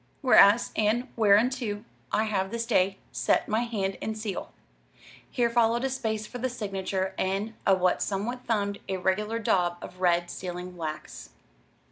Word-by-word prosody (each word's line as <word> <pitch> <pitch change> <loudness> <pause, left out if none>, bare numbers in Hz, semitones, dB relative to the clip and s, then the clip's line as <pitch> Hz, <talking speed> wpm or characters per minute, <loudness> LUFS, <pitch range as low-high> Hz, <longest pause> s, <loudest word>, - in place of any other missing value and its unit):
Whereas 235 -4 +6
and 225 +4 +1
whereunto 220 0 +2 0.3
I 220 - +2
have 195 -3 -1
this 230 +2 -3
day 195 -4 +2
set - - +1
my 215 +1 +1
Hand 205 -5 -2
and 220 0 -3
Seal." 215 -3 -5 0.8
Here 240 -1 +1
followed 235 +1 +2
a 270 - 0
space 220 -4 -2
for 245 +4 -8
the 255 +2 -1
signature, 195 -4 -3
and 195 +4 -1
a 185 -2 +4
somewhat 230 +6 -2
thumbed, 200 -3 0
irregular 190 +4 0
daub 180 -6 +1
of 180 - -10
red 175 -1 +2
sealing 180 0 -6
wax. 155 - -6
205 Hz, 145 wpm, -27 LUFS, 190-230 Hz, 0.8 s, Whereas